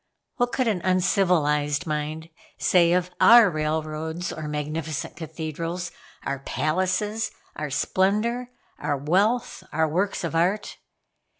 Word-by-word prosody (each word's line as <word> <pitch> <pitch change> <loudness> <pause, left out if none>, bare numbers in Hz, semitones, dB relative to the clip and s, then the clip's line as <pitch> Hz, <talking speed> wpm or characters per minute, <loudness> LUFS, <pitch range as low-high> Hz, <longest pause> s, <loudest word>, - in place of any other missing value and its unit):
What 245 -1 +1
could 255 -2 0
an 200 -6 0
uncivilized 175 -5 +2
mind 155 +1 -3 0.3
say 170 -2 +4
of 180 0 +1
our 230 -4 +8
railroads, 155 +2 -2
or 155 -1 -6
magnificent 150 0 -4
cathedrals, 165 +2 -5 0.3
our 140 -1 -3
palaces, 185 +10 -1 0.3
our 150 -1 -4
splendor, 215 - 0 0.3
our 145 - -1
wealth, 195 - +1
our 160 0 +2
works 185 +6 -1
of 170 - -3
art. 180 +6 0
170 Hz, 115 wpm, -25 LUFS, 155-190 Hz, 0.3 s, our